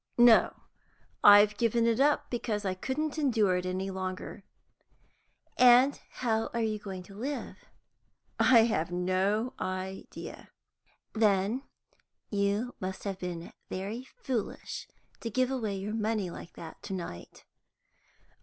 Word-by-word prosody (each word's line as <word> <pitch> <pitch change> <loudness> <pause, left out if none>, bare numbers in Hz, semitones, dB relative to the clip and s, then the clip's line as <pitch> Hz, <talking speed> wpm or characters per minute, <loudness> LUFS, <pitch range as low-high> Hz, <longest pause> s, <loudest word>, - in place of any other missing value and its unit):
"No. 240 -2 +6 0.7
I've 205 0 +8
given 230 0 +2
it 230 0 +2
up 290 +1 +2
because 220 -4 -2
I 190 - 0
couldn't 290 +10 -3
endure 220 -10 +2
it 180 0 -3
any 190 +1 -2
longer." 185 +1 -5 1.2
"And 250 +3 +6
how 225 -3 0
are 230 - +1
you 215 -1 -1
going 190 -3 -7
to 195 - -14
live?" 270 +7 -4 0.8
"I 240 -3 +7
have 175 -7 0
no 190 +7 0
idea." 185 +1 -6 0.6
"Then 210 +2 +2 0.7
you 205 +4 0
must 190 0 -5
have 195 -2 -4
been 175 -2 -6 0.2
very 210 +7 -4 0.2
foolish 245 -5 -3 0.3
to 230 - -4
give 255 +3 +1
away 220 -6 -2
your 195 +2 -4
money 215 -4 -1
like 170 - -10
that 165 -1 -10
to 195 - -6
night." 170 - -7
210 Hz, 125 wpm, -30 LUFS, 190-240 Hz, 1.2 s, I've